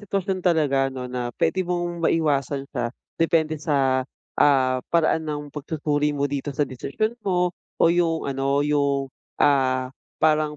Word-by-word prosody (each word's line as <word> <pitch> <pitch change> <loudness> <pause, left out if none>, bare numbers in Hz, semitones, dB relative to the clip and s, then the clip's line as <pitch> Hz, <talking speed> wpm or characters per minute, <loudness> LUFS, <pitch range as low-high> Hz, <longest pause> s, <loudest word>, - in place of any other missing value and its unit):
sitwasyon 195 -2 -2
talaga 145 -6 +2
'no, 130 -1 -6
na 125 -1 -3
puwede 190 - +1
mong 175 -1 -2
maiwasan 140 -3 0
siya 120 -3 -1 0.3
depende 160 -2 +2
sa, 135 -4 +2 0.4
ah, 130 -3 +4
paraan 160 -1 +1
ng 145 -1 -5
pagsusuri 150 0 -1
mo 140 - 0
dito 140 0 -3
sa 145 - +3
desisyon 140 - -3
mo 180 -3 +1 0.2
o - - +3
yung 165 -2 +1
ano 140 +1 0
yung, 140 -2 0 0.2
ah, 130 -2 +2 0.2
parang 155 -1 +2
145 Hz, 140 wpm, -24 LUFS, 135-165 Hz, 0.4 s, ah